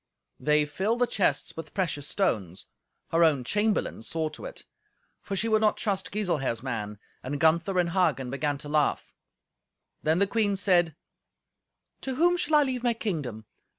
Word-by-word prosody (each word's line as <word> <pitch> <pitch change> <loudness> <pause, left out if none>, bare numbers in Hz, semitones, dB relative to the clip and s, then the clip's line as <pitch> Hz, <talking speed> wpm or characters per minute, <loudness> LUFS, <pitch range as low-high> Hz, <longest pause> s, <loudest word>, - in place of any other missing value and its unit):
They 150 0 +3
filled 190 +10 -1
the 245 - +3
chests 205 -5 0
with 165 - -8
precious 165 -7 -1
stones. 105 - -1 0.5
Her 165 +1 +4
own 150 -6 +3
chamberlain 210 - 0
saw 160 +7 -1
to - - -10
it, - - -8 0.6
for 200 - -4
she 220 +4 0
would 215 -1 +3
not 215 -1 +3
trust 195 -3 -2
Giselher's 150 - -1
man. 105 -5 -4 0.2
And 140 +3 -4
Gunther 170 +5 +3
and 175 -1 +2
Hagen 150 -9 +1
began 145 +1 -1
to 145 +1 -9
laugh. 150 -1 0 0.9
Then 160 +2 +2
the 200 - +4
queen 205 -1 +1
said, 175 -5 +2 1.1
"To 265 -1 -3
whom 350 +5 +4
shall 315 -3 +1
I 295 - +6
leave 255 -3 -2
my 240 -1 +1
kingdom? 145 - -4
170 Hz, 165 wpm, -27 LUFS, 145-210 Hz, 1.1 s, I